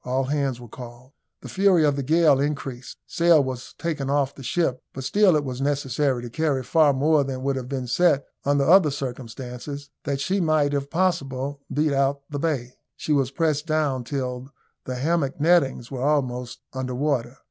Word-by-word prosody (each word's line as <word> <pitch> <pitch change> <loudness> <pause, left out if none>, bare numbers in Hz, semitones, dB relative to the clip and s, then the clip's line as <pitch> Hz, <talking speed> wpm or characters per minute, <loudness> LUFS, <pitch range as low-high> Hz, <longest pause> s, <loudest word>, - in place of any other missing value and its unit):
All 130 +2 0
hands 135 -2 -1
were 120 - -10
called. 120 +2 -11 0.3
The - - -9
fury 190 -4 +3
of 145 -1 +2
the 140 - -2
gale 155 0 +4
increased. 135 -3 -4
Sail 170 -3 +4
was 130 -2 -6
taken 150 -5 -3
off 140 -1 +1
the - - -12
ship, 130 -1 -1
but 135 - -6
still 200 +4 +4
it 150 - +1
was 130 0 -5
necessary 140 -2 0
to 120 - -6
carry 145 -2 0
far 155 +3 +4
more 145 +2 +3
than 130 -1 -5
would 140 0 0
have 130 -1 -5
been 135 -2 -3
set 140 +2 +2 0.2
under 140 0 +2
other 165 +2 +6
circumstances, 130 +1 -6
that 140 -1 -1
she 185 +7 0
might, 155 -3 +2
if 140 0 -2
possible, 145 -6 -1
beat 150 0 +1
out 135 0 +2
of 140 - -30
the 145 - -3
bay. 135 -6 -2 0.2
She 155 - -1
was 135 -3 +2
pressed 155 +1 -1
down 150 -5 0
till 125 -1 -4 0.4
the 130 - -4
hammock 145 +1 0
nettings 145 -6 +2
were 130 -2 -4
almost 125 -4 -1
under 130 -1 -3
water. 130 -3 -1
140 Hz, 190 wpm, -24 LUFS, 130-150 Hz, 0.4 s, other